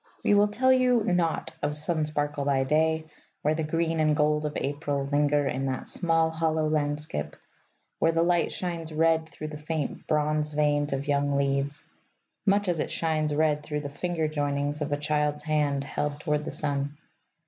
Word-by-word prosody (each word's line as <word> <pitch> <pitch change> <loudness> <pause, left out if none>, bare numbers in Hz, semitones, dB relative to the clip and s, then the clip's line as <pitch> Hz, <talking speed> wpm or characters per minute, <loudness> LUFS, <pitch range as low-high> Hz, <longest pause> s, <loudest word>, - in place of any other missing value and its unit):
We - - +4
will 205 0 +5
tell 260 +5 +3
you 250 -3 +3
naught 175 -4 0
of 150 0 -1
sun 155 0 0
sparkle 145 -1 -1
by 140 -1 +2
day 160 +3 +1 0.4
where 150 - +3
the 160 - -2
green 165 +1 0
and 155 -1 +3
gold 150 0 +2
of 150 - -4
April 145 0 -2
linger 145 0 +2
in 135 +1 -1
that 130 -1 -3
small 165 -2 +2
hollow 160 -1 0
landskip, 150 - -2 0.6
where 165 - +4
the 165 0 +2
light 175 -1 +2
shines 170 -3 -4
red 160 0 +2
through 155 0 -7
the 150 -1 -7
faint 150 -1 -4
bronze 150 0 +1
veins 145 -1 +1
of 135 +1 -2
young 145 -1 +1
leaves 140 +1 0 0.6
much 200 +1 +3
as 175 -3 0
it - - -1
shines 155 -2 0
red 150 -1 +2
through 150 0 -3
the 145 - -5
finger 165 +2 -2
joinings 145 0 -1
of 150 0 -2
a 145 - +1
child's 150 0 0
hand 150 -3 +1
held 145 +1 -3
toward 150 0 -1
the - - -4
sun. 145 0 -2
150 Hz, 180 wpm, -27 LUFS, 145-160 Hz, 0.6 s, will